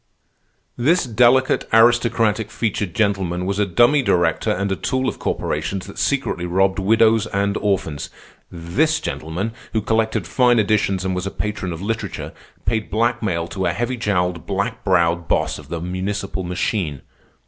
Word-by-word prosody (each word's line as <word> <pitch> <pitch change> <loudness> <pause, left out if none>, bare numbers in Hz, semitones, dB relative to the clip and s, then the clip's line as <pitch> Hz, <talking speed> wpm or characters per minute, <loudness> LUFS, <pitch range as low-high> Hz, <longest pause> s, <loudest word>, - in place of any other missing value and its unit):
"This 155 +9 +3
delicate, 125 +2 +3
aristocratic 115 -2 +3
featured 105 -7 -2
gentleman 95 -4 0
was 100 +2 -1
a 105 - +2
dummy 120 - +4
director 90 -8 +1
and 100 +2 0
a - - +1
tool 130 +6 -1
of - - -3
corporations 95 -2 -2
that - - -9
secretly 85 +1 0
robbed 95 +2 +2
widows 110 +2 +3
and 100 0 0
orphans. 95 -8 -1 0.4
This 125 - 0
gentleman, 80 +10 -4 0.2
who 110 - +1
collected 110 -3 0
fine 120 +6 +3
editions 100 -3 +1
and 95 - 0
was 90 +1 -3
a - - -1
patron 105 -3 -4
of 85 +2 -6
literature, 115 +2 -4 0.3
paid 110 -1 -1
blackmail 110 -6 0
to 95 +1 -2
a - - 0
heavy 120 +3 -2
jowled, 90 -7 -1
black 100 +4 -2
browed 85 -3 +2
boss - - 0
of - - -14
a 85 - -2
municipal 95 +3 -3
machine. 90 - -2
100 Hz, 155 wpm, -21 LUFS, 90-115 Hz, 0.4 s, dummy